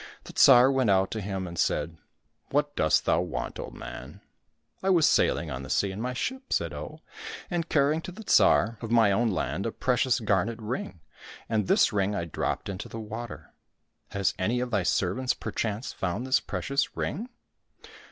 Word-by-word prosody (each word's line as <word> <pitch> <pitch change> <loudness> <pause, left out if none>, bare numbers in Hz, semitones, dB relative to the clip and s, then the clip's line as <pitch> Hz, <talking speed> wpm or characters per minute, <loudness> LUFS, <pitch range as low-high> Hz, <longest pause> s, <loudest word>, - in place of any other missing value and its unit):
The - - -11
Tsar 130 0 +7
went 130 -4 +2
out 95 -1 +3
to 110 - -3
him 95 -1 -3
and 85 -1 -7
said, 80 +2 0 0.3
'' - - -45
What 145 +1 0
dost 80 - +2
thou - - +3
want, - - -4
old - - -7
man? - - -9 0.2
" - - -50
— - - -49
*' - - -40
I 190 - 0
was 170 -5 +5
sailing 80 -3 +2
on 65 +1 -4
the 70 - -9
sea 100 +7 +1
in 100 +3 -6
my 125 +1 -2
ship," 260 - -4
said - - 0
Oh, - - -8 0.2
'' 445 - -10
and 170 -1 -2
carrying 150 +2 +2
to 180 - -7
the 220 +5 -10
Tsar 115 - +4
of 115 - -5
my 115 -3 +4
own 115 +4 +2
land 100 +1 -2
a - - -2
precious 125 +1 +1
garnet 105 +1 0
ring, 105 -6 -5 0.5
and 110 -4 0
this - - +4
ring 100 0 +1
I 85 - -2
dropped 85 - -3
into 95 -2 -6
the 115 - -7
water. 110 +2 -8 0.6
Has 100 -1 0
any 110 +7 0
of 125 0 -3
thy 100 - +2
servants 100 +8 0
perchance 110 +1 -3
found 95 +6 -3
this 130 0 +3
precious 140 +1 -2
ring 225 +10 -3
115 Hz, 200 wpm, -27 LUFS, 95-130 Hz, 0.6 s, Tsar